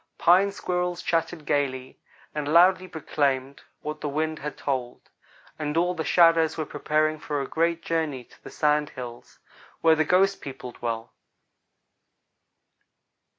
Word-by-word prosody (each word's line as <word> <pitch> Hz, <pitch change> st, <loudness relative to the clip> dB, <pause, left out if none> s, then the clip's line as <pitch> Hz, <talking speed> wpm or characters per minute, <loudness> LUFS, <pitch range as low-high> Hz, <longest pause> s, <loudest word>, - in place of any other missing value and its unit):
Pine 190 Hz, +4 st, +5 dB
squirrels 180 Hz, -2 st, -2 dB
chattered 165 Hz, -2 st, -1 dB
gayly, 130 Hz, -3 st, -1 dB, 0.3 s
and 150 Hz, -1 st, -3 dB
loudly 185 Hz, +2 st, +5 dB
proclaimed 140 Hz, -4 st, -1 dB, 0.2 s
what 150 Hz, 0 st, -6 dB
the 150 Hz, -, -2 dB
wind 155 Hz, +2 st, -2 dB
had 150 Hz, +1 st, -6 dB
told; 130 Hz, -3 st, -4 dB, 0.5 s
and 150 Hz, 0 st, -2 dB
all 175 Hz, +2 st, +2 dB
the 165 Hz, -3 st, -3 dB
shadows 165 Hz, +1 st, +4 dB
were 155 Hz, -, -2 dB
preparing 155 Hz, +1 st, 0 dB
for 150 Hz, -1 st, -3 dB
a 135 Hz, -, -3 dB
great 170 Hz, +1 st, 0 dB
journey 155 Hz, -6 st, -2 dB
to -, -, -23 dB
the -, -, -9 dB
Sand 150 Hz, -1 st, +1 dB
Hills, 120 Hz, -2 st, -9 dB, 0.4 s
where 160 Hz, -1 st, +5 dB
the 155 Hz, -, +2 dB
ghost 195 Hz, +4 st, +2 dB
people 130 Hz, -2 st, -7 dB
dwell. 115 Hz, -1 st, -5 dB
155 Hz, 140 wpm, -26 LUFS, 140-170 Hz, 0.5 s, Pine